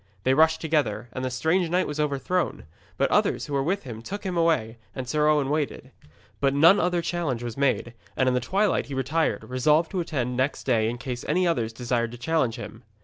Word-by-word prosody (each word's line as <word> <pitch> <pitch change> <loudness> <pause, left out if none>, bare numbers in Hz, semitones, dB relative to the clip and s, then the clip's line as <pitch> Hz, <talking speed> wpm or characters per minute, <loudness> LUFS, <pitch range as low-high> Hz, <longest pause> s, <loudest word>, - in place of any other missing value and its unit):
They 130 - +3
rushed 160 +3 +4
together, 140 -8 0
and 130 - -4
the 130 - -1
strange 160 +7 +1
knight 180 +2 +2
was 150 0 -5
overthrown. 150 +5 -1 0.3
But - - +1
others - - +2
who 145 - -7
were 140 - +2
with 185 +8 -1
him 115 -4 -8
took 200 - -6
him 185 -3 -3
away, 155 -10 +1 0.2
and 130 -1 -5
Sir 150 +4 +1
Owen 150 -3 +2
waited. 145 -3 -2 0.5
But 140 0 +1
none 165 +7 +6
other 175 -1 +1
challenge 150 -10 -2
was 120 -2 -5
made, 135 -4 0 0.2
and 130 - +2
in 130 - +3
the 125 - +2
twilight 195 +11 0
he 140 - -5
retired, 145 +5 -1
resolved 150 +6 +2
to 190 - -2
attend 130 -7 -2
next 130 +3 -1
day 115 -4 +2
in 120 - -4
case 125 -1 -5
any 185 0 +2
others 120 -10 0
desired 120 0 -1
to - - -8
challenge 130 -2 0
him. - - -9
140 Hz, 215 wpm, -25 LUFS, 125-165 Hz, 0.5 s, none